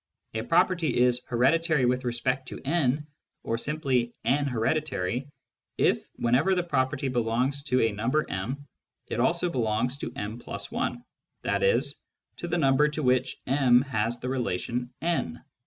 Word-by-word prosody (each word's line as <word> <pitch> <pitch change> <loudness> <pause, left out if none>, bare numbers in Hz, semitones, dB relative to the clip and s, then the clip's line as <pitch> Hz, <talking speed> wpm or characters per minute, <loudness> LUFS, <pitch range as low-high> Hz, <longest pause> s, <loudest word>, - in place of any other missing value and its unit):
A 110 - -1
property 170 +3 +2
is 125 0 +3
"hereditary 150 +4 +3
with 125 +1 +1
respect 125 +2 -1
to - - -7
N," 150 -1 +1 0.4
or 115 - -1
simply 130 -5 0
" - - -28
N 140 +2 +2
hereditary," 125 -2 -1 0.5
if, - - +2
whenever 125 +11 +2
the 180 - +1
property 135 -4 0
belongs 125 +3 0
to 130 -3 +2
a 115 - +3
number 120 +9 0
m, 125 +10 -4 0.4
it - - -4
also 170 +7 +2
belongs 120 +1 0
to - - -4
m 110 +3 -5
\ - - -6
i, - - 0 0.5
i.e. 485 0 +3 0.6
to 175 - -5
the 175 +1 0
number 140 -1 +4
to 150 0 -3
which 130 0 +2
m 130 -2 +4
has 120 -3 -1
the 125 - -5
relation 125 0 -2
N. 165 - -1
130 Hz, 155 wpm, -27 LUFS, 120-150 Hz, 0.6 s, number